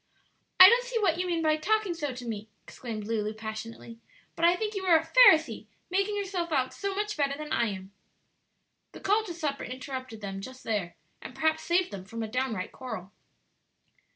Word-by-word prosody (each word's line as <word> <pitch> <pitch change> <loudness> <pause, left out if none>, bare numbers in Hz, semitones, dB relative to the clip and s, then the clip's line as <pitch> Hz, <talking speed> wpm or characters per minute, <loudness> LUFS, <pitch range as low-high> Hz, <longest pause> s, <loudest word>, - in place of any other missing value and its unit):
"I 370 - +13
don't 475 +4 +5
see - - -3
what 355 -6 +1
you 365 - -1
mean 335 -2 -1
by 310 0 +3
talking 420 +3 0
so 300 -4 -3
to 250 -1 -8
me," 220 -1 -5
exclaimed 220 -4 -7
Lulu, 215 -1 -2
passionately; 225 +1 -8 0.4
"but 330 - -5
I 345 +1 +5
think 425 +3 -3
you 395 -2 -4
are 340 -3 +6
a 320 - -3
Pharisee 320 - +5 0.2
making 395 +2 0
yourself 370 -4 -3
out 260 -3 0
so 395 -1 -3
much 420 +1 -2
better 280 -2 0
than 305 0 -5
I 235 - +2
am!" 190 -1 -6 1.0
The - - -10
call 420 +3 +2
to 355 - -6
supper 295 -4 -3
interrupted 255 -2 -7
them 195 -1 -5
just 260 +5 -10
there, 205 -6 -2 0.3
and - - -9
perhaps 315 0 +1
saved 350 -3 +1
them 190 -2 -7
from 230 +3 -5
a - - -3
down 255 +1 -1
right 185 -1 -5
quarrel. 220 -8 -7
280 Hz, 200 wpm, -28 LUFS, 225-365 Hz, 1.0 s, I